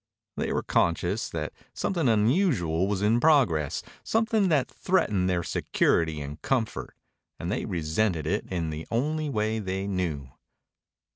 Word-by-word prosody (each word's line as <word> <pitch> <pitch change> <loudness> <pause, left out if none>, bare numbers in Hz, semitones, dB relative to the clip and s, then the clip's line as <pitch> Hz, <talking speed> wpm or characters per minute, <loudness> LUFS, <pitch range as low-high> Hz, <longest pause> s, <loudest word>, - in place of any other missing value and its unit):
They - - -2
were - - 0
conscious 90 +5 +1
that 75 -2 -4 0.2
something 170 -9 0
unusual 110 - +2
was 100 -1 -1
in 110 +3 +3
progress, 120 - +3 0.2
something 225 -3 +2
that 145 -6 +2
threatened 110 - +1
their 90 -1 0
security 80 -2 +1
and 75 +2 -7
comfort, 120 -5 -2 0.4
and - - -3
they - - -1
resented 85 0 0
it 100 +6 -1
in 85 -4 -2
the 80 +1 -6
only 150 +6 0
way 110 -3 0
they 95 -1 -3
knew. 85 -9 -2
100 Hz, 140 wpm, -27 LUFS, 85-135 Hz, 0.4 s, in